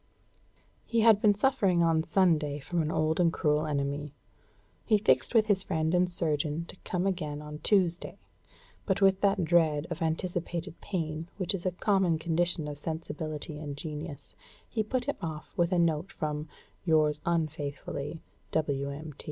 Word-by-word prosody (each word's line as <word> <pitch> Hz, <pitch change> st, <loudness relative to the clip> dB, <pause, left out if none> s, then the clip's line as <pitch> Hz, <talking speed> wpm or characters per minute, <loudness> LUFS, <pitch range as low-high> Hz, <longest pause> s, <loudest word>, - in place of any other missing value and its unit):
He 230 Hz, -1 st, +1 dB
had 220 Hz, -2 st, +6 dB
been 210 Hz, -3 st, +5 dB
suffering 200 Hz, -8 st, +3 dB
on 165 Hz, -1 st, +3 dB
Sunday 160 Hz, -4 st, +2 dB
from 165 Hz, +4 st, -2 dB
an 155 Hz, -, -1 dB
old 155 Hz, +1 st, +1 dB
and 170 Hz, -2 st, +4 dB
cruel 150 Hz, -1 st, +1 dB
enemy. 145 Hz, 0 st, -2 dB, 0.7 s
He 215 Hz, -, +4 dB
fixed 130 Hz, -, +2 dB
with 220 Hz, -1 st, +6 dB
his 205 Hz, -3 st, +2 dB
friend 160 Hz, -2 st, -1 dB
and 180 Hz, 0 st, +3 dB
surgeon 155 Hz, -1 st, -1 dB
to -, -, -7 dB
come 180 Hz, +1 st, -2 dB
again 155 Hz, -6 st, -2 dB
on 150 Hz, 0 st, -8 dB
Tuesday, 180 Hz, -1 st, +1 dB, 0.7 s
but 190 Hz, -2 st, +1 dB
with 195 Hz, -1 st, +4 dB
that 195 Hz, -3 st, +3 dB
dread 160 Hz, -3 st, +3 dB
of 170 Hz, +1 st, -4 dB
anticipated 170 Hz, +1 st, -2 dB
pain 165 Hz, -3 st, -3 dB
which 185 Hz, -1 st, -1 dB
is 185 Hz, -1 st, -2 dB
a -, -, +1 dB
common 185 Hz, -2 st, +2 dB
condition 165 Hz, 0 st, 0 dB
of 145 Hz, -1 st, -6 dB
sensibility 155 Hz, -1 st, -5 dB
and 145 Hz, -2 st, -6 dB
genius, 150 Hz, -1 st, -7 dB, 0.3 s
he 220 Hz, -, -1 dB
put 245 Hz, +4 st, -1 dB
him 285 Hz, -, -2 dB
off 155 Hz, -2 st, -6 dB
with 175 Hz, +1 st, +2 dB
a 180 Hz, -, +2 dB
note 170 Hz, +1 st, +1 dB
from 150 Hz, 0 st, -3 dB, 0.3 s
"yours 155 Hz, -3 st, +3 dB
unfaithfully, 150 Hz, -2 st, -3 dB, 0.3 s
W.M. 145 Hz, 0 st, -2 dB
160 Hz, 160 wpm, -29 LUFS, 150-180 Hz, 0.7 s, had